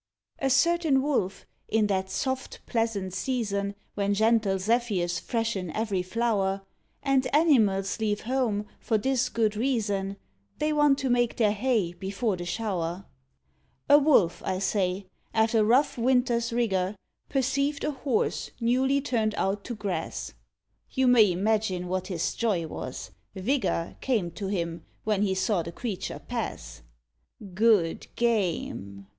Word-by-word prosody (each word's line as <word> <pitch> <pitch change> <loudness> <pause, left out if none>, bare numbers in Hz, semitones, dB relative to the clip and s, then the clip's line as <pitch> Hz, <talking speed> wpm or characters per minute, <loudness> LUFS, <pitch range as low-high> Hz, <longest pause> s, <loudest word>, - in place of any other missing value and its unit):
A 270 - +1
certain 290 0 +3
Wolf, 230 -10 -1 0.2
in 220 -1 +2
that 190 -2 0
soft, 260 +7 -3
pleasant 220 -5 -1
season, 200 -5 -1 0.2
When 200 0 0
gentle 220 -2 +3
zephyrs 190 -5 0
freshen 225 -6 -2
every 215 -4 -1
flower, 195 -1 0 0.4
And 275 -2 +2
animals 220 - +3
leave 210 -2 0
home, 230 -4 0
for 220 - +1
this 260 +3 +1
good 220 -2 +1
reason 205 -5 -1 0.4
They 305 0 0
want 295 -2 +4
to 270 - -1
make 240 -1 +2
their 215 -3 +3
hay 210 -5 0
before 195 +3 -2
the 175 -1 -6
shower: 185 -4 -2 0.8
A 290 - +8
Wolf, 275 - +3
I 185 - -1
say, 190 -1 0 0.3
after 220 0 +3
rough 250 +4 +3
winters 240 -1 +2
rigour, 200 -5 0 0.3
Perceived 275 +2 0
a 300 - 0
Horse 265 -4 -1
newly 260 +4 +2
turned 225 -6 0
out 200 +1 -1
to 240 - -4
grass. 205 -3 -4 0.6
You 260 -1 +1
may 230 -6 +6
imagine 190 -1 0
what 185 0 -2
his 175 -3 -1
joy 205 -8 0
was. 130 -4 -6 0.2
Vigour 190 -5 -1
Came 215 -10 0
to 195 +3 -5
him, 170 -4 -3 0.2
when 210 -2 +1
he 195 -2 +1
saw 190 0 +1
the 170 - -6
creature 205 +1 -4
pass. - - -5 0.7
"Good 200 -5 +3
game!" 170 - -1
215 Hz, 135 wpm, -27 LUFS, 190-245 Hz, 0.8 s, A